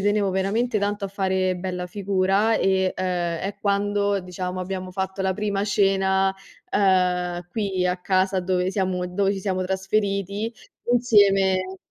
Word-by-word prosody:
tenevo 205 0 +2
veramente 210 +5 0
tanto 205 0 -1
a - - -3
fare 190 -1 0
bella 180 0 -4
figura 195 +3 +1
e, 190 -1 +1
ehm, 175 -2 -1
è 195 +1 -4
quando, 200 0 +1
diciamo, 180 0 -5
abbiamo 185 0 -4
fatto 190 +1 -4
la 190 0 +1
prima 205 0 -1
cena, 195 -1 +2 0.4
uhm, 180 -2 +1
qui 190 -3 -1
a 180 +1 0
casa 190 +1 +1
dove 180 0 0
siamo 185 -2 -1
dove 195 +2 0
ci - - -4
siamo 185 -1 -1
trasferiti 200 +2 -1 0.4
insieme 195 -5 +3
190 Hz, 140 wpm, -24 LUFS, 185-200 Hz, 0.4 s, insieme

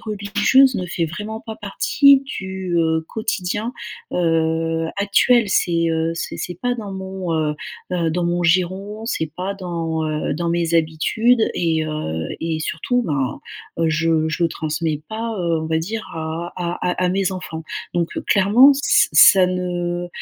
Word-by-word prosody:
religieuse 215 +5 +3
ne 185 - -3
fait 170 -1 -2
vraiment 210 +7 -6
pas 220 -1 -7
partie 270 +6 +4
du, 190 -9 -4
heu, 160 -1 +1
quotidien, 215 0 -2 0.4
heu, 165 -1 0
actuel. 205 +3 +3
C'est, 170 -3 +1
heu, 160 0 0
c'est 165 - -5
c'est 180 - -5
pas 245 0 0
dans 205 -4 -6
mon, 190 -3 -4
heu, 150 -1 0 0.4
heu, 170 -2 0
dans 180 - -1
mon 175 0 0
giron, 185 +4 0
c'est 160 -9 -2
pas 190 +2 -3
dans, 165 -4 -3
heu, 150 -2 -2
dans 170 +1 -2
mes 170 -1 0
habitudes 220 +9 +2
et, 160 -2 0
heu, 80 - -3
et 160 -1 -2
surtout 245 +11 -1
ben, 140 - -2 0.4
heu, 165 -1 +2
je 160 0 +1
je 170 +2 0
transmets 155 -1 -2
pas, 225 +1 -4
heu, 170 -2 0
on - - -3
va 160 0 0
dire 220 +7 -4
à 160 +2 -4
à 175 -1 -3 0.3
à 180 - +2
mes 190 +1 0
enfants. 160 -3 -6 0.3
Donc 170 -1 0 0.2
clairement, 210 +8 +6
ç 280 - +3
ça 185 -2 +7
ne, 175 -1 -2
175 Hz, 160 wpm, -20 LUFS, 160-200 Hz, 0.4 s, ça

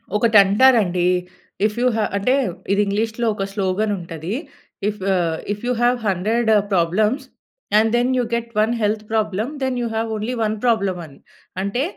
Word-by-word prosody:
ఒకటి 220 0 +4
అంటారండి. 195 -5 +3 0.6
If 215 +1 -1
you 250 - +3
have 215 - 0
అంటే, 250 +6 +1 0.4
ఇది 200 +1 +3
ఇంగ్లీష్‌లో 220 +3 -1
ఒక 195 - -3
స్లోగన్ 205 +1 0
ఉంటది. 165 +2 -6 0.6
ఇఫ్ 210 - -6
ఆహ్, 165 -3 0 0.2
"if 210 - -10
you - - +1
have 245 +1 +3
100 220 +5 0 0.2
problems, 210 +10 +1 0.5
and 220 +1 +4
then 245 +2 +2
you 250 - +2
get 235 0 -3
1 225 +2 +1
health 210 +1 0
problem, 215 +3 -1
then 260 -1 -1
you 235 - -1
have 225 0 -1
only 235 +4 -3
1 215 0 0
problem" 200 -6 +1
అని. 140 -3 -16 0.4
అంటే, 240 +7 -1
215 Hz, 165 wpm, -21 LUFS, 195-235 Hz, 0.6 s, ఒకటి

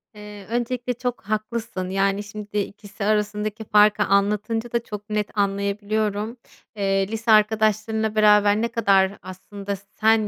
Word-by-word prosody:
Eee, 210 -1 -10
öncelikle 245 +1 -2
çok 245 0 -4
haklısın, 215 -2 -3
yani, 195 +1 0
şimdi 210 0 -7
2'si 205 +1 -4
arasındaki 210 +1 -1
farkı 210 0 +4
anlatınca 210 +4 0
da 235 -1 0
çok 210 -1 -8
net 210 0 -2
anlayabiliyorum. 205 +3 -1 0.4
Eee, 195 -1 +1
lise 225 +1 -1
arkadaşlarınla 215 0 +2
beraber 210 0 +5
ne 235 - +1
kadar 200 -4 +3
aslında 200 +2 -7
sen 215 +2 +1
210 Hz, 130 wpm, -23 LUFS, 200-220 Hz, 0.4 s, beraber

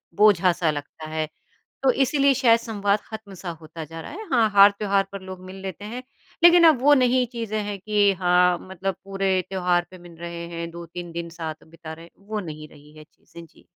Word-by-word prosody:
बोझा-सा 180 -5 +4
लगता 150 +2 -8
है। 155 0 -2 0.6
तो 265 - +5
इसीलिए 275 +1 +3
शायद 235 -3 +4
संवाद 205 -3 0
खत्म-सा 200 -5 -8
होता 160 +1 -8
जा 165 +2 -9
रहा - - -9
है 420 +7 -7
हाँ, 230 -4 +4
हार 200 0 +7
त्योहार 200 -1 +2
पर 200 -1 -7
लोग 185 -1 -9
मिल 185 +1 -9
लेते 195 +1 -7
हैं। 240 +4 -6 0.4
लेकिन 345 0 +8
अब 305 -6 +5
वो 290 +2 +6
नहीं 255 -1 +3
चीज़े 225 -3 -4
है 205 -1 -4
कि 205 0 +2
हाँ, 180 0 +4
मतलब 190 0 -4
पूरे 195 -1 0
त्यौहार 180 -2 +1
पे 185 - -11
मिल 175 -1 -14
रहे 170 0 -6
हैं 170 0 -4
2-3 170 0 -8
दिन 170 0 -5
साथ 160 -2 -7
बिता 160 0 -10
रहे 165 +1 -12
हैं, - - -20 0.2
वो 215 -1 -3
नहीं 155 -5 -8
रही 150 +1 -18
है 155 - -11
चीज़ें। 170 +2 -15
जी। - - -23
190 Hz, 205 wpm, -24 LUFS, 170-215 Hz, 0.6 s, लेकिन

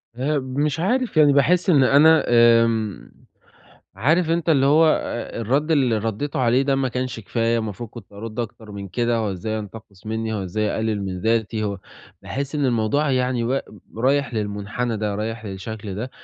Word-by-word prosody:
آآ، 145 +4 0
مش 140 +4 -2
عارف 240 +3 0
يعني 145 -2 +6
باحس 175 +7 +3
إن 145 -6 +5
أنا 155 +5 +5
آمم، 115 -3 +3 0.9
عارف 160 +6 +2
أنت 170 0 0
اللي 135 -4 +4
هو 155 +3 +5
أ 120 -6 -1
الرد 135 +8 0
اللي 130 -8 +2
رديته 115 +7 -3
عليه 125 +1 +3
ده 135 0 +1
ما 135 -1 0
كانش 125 -1 -4
كفاية، 115 +2 0
المفروض 110 +1 -5
كنت 110 -5 -12
أرد 110 +3 -6
أكتر 110 -1 -7
من 100 -1 -7
كده 120 +5 0
هو 110 -3 -1
إزاي 110 +4 -3
ينتقص 105 -1 -11
منّي؟ 110 0 -3
هو 105 - -2
إزاي 95 +4 -2
يقلل 110 -1 -1
من 95 -2 -4
ذاتي؟ 110 0 0
هو 100 -2 -3 0.4
باحس 140 +2 -4
إن 145 -1 0
الموضوع 130 +4 +1
يعني 125 -2 0
و 130 +3 0 0.4
رايح 135 +2 +1
للمنحنى 105 +3 -3
ده، 105 -1 -2
رايح 110 +2 -4
للشكل 100 +1 -6
ده، 115 +6 -5
115 Hz, 175 wpm, -22 LUFS, 110-140 Hz, 0.9 s, يعني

